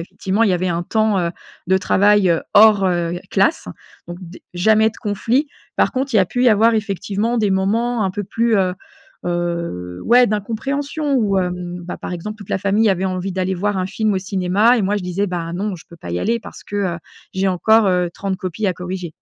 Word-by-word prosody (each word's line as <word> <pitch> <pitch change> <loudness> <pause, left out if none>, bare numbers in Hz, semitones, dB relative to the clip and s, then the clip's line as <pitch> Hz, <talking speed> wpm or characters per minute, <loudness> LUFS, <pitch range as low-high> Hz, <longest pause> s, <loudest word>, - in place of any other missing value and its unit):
effectivement 190 +5 -2
il 220 - +4
y 185 - +2
avait 180 +1 -1
un 170 0 -1
temps, 215 +1 +1
heu, 170 -1 -1 0.4
de 190 - +3
travail 200 -1 +3 0.2
hors, 210 -2 +6
heu, 175 -1 -1
classe 195 +11 +1 0.4
donc 175 0 -7
des 180 +1 -11
jamais 220 +4 +4
de 225 - -11
conflit. 230 +7 0 0.3
Par - - +2
contre, 265 -1 -2
il - - +6
y - - +6
a 185 - +4
pu 245 +7 -1
y 250 - +7
avoir 225 +2 +4
effectivement 210 +2 -1
des 210 -3 +1
moments 220 +5 0
un 190 - 0
peu 205 +1 -4
plus, 230 +2 +1
heu 185 -2 +1 0.5
heu, 170 - -3
ouais 245 +2 +5
d'incompréhension 275 +8 -2
où, 210 -6 +1
hem, 180 -1 -3
bah, 180 - -6
par - - -6
exemple 210 +5 -6
toute 205 - -12
la - - 0
famille 200 +3 +2
avait 190 -1 +1
envie 185 0 -2
d'aller 185 0 -1
voir 205 +3 -1
un 185 - -1
film 215 +1 -1
au 190 - +1
cinéma 195 +5 +2
et - - 0
moi 200 +2 0
je 205 - -3
disais: 180 +3 -1
«Bah 170 -3 -4
non 195 +2 -3
je 160 - -15
peux 170 - -14
pas 90 - -9
y 90 - -2
aller 230 +1 0
parce - - -11
que, 205 - -6 0.2
heu, - - -9 0.4
j'ai 190 0 +1
encore, 215 +4 +3
heu, 180 -1 +2
30 195 -1 -3
copies 190 +3 -3
à 185 - +2
corriger». 180 -2 -6
195 Hz, 225 wpm, -19 LUFS, 180-220 Hz, 0.5 s, y